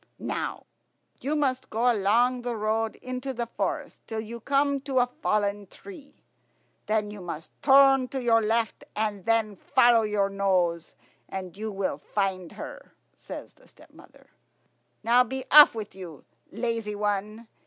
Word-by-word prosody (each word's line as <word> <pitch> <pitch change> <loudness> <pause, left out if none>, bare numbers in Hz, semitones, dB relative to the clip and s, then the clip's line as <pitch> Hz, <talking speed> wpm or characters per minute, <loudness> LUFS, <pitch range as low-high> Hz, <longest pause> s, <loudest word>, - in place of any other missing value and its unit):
"You 290 +4 -2
must 265 -4 -1
go 240 +3 +2
along 235 +5 +2
the 240 -1 -3
road 220 +1 -1
into 255 +1 -4
the 235 0 -2
forest 235 - -4
till 225 - -4
you 230 +2 -8
come 280 +2 +1
to 270 -1 -3
a 245 - +5 0.2
fallen 205 -3 0
tree; 315 - -14 0.6
then 215 -1 0
you 205 -2 -9
must 165 -3 -7
turn 270 -1 +6
to 265 - -4
your 230 -2 +3
left, 225 +1 -1
and 210 -3 -2
then 225 -2 +1
follow 240 +1 +4
your 210 -2 +1
nose 185 -4 0 0.3
and 185 -2 -6
you 215 +2 -5
will 195 -1 -2
find 190 -4 -2
her," - - -10 0.2
says - - -9
the - - -23
stepmother. - - -19 0.7
"Now, 240 +3 +5
be 260 +2 -5
off 295 -4 +9
with 215 -3 -6
you, 175 -7 -10 0.3
lazy 225 -1 -3
one. 210 +2 -3
225 Hz, 145 wpm, -26 LUFS, 205-250 Hz, 0.7 s, off